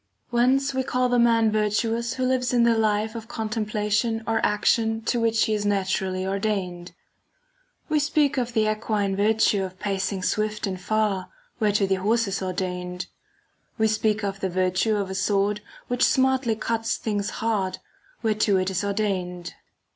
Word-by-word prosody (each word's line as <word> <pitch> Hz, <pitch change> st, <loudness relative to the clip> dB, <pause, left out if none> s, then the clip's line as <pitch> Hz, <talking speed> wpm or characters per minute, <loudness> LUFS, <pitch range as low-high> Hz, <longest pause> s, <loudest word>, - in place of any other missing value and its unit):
Whence 260 Hz, +3 st, +2 dB
we 265 Hz, -, 0 dB
call 255 Hz, -1 st, 0 dB
the 245 Hz, 0 st, +3 dB
man 230 Hz, -2 st, +4 dB
virtuous 225 Hz, +2 st, 0 dB
who 260 Hz, -, -2 dB
lives 255 Hz, -1 st, +1 dB
in 240 Hz, -, +4 dB
the 235 Hz, -1 st, +4 dB
life 215 Hz, 0 st, +1 dB
of 225 Hz, -2 st, -7 dB
contemplation 215 Hz, 0 st, -1 dB
or 225 Hz, 0 st, 0 dB
action 225 Hz, +2 st, +2 dB
to 240 Hz, +1 st, 0 dB
which 225 Hz, -1 st, +2 dB
he 220 Hz, -, 0 dB
is 210 Hz, -1 st, -1 dB
naturally 190 Hz, -2 st, 0 dB
ordained; 190 Hz, -3 st, -2 dB, 0.9 s
we 310 Hz, -1 st, +2 dB
speak 295 Hz, -2 st, +2 dB
of 245 Hz, -2 st, -2 dB
the 220 Hz, -2 st, +2 dB
equine 215 Hz, -2 st, 0 dB
virtue 210 Hz, -1 st, +2 dB
of 185 Hz, -1 st, -7 dB
pacing 195 Hz, -1 st, -2 dB
swift 215 Hz, +2 st, -1 dB
and 185 Hz, -2 st, -4 dB
far, 210 Hz, -2 st, 0 dB, 0.3 s
whereto 210 Hz, -2 st, +2 dB
the 190 Hz, -1 st, 0 dB
horse 225 Hz, +2 st, +2 dB
is 195 Hz, 0 st, -2 dB
or 185 Hz, -1 st, -2 dB
dained; 180 Hz, -1 st, -4 dB, 0.7 s
we 220 Hz, -1 st, +3 dB
speak 215 Hz, 0 st, 0 dB
of 195 Hz, -1 st, -3 dB
the 190 Hz, -, -1 dB
virtue 185 Hz, +4 st, +1 dB
of 200 Hz, -2 st, -2 dB
a -, -, -3 dB
[So] 200 Hz, +2 st, 0 dB
sword 205 Hz, +1 st, +1 dB, 0.3 s
which 245 Hz, 0 st, 0 dB
smartly 265 Hz, -3 st, +3 dB
cuts 225 Hz, +1 st, -1 dB
things 205 Hz, -2 st, -2 dB
hard, 200 Hz, -5 st, -1 dB, 0.5 s
whereto 215 Hz, -2 st, +2 dB
it 185 Hz, 0 st, 0 dB
is 190 Hz, +2 st, -1 dB
ordained. 190 Hz, -4 st, -2 dB
215 Hz, 170 wpm, -25 LUFS, 195-230 Hz, 0.9 s, man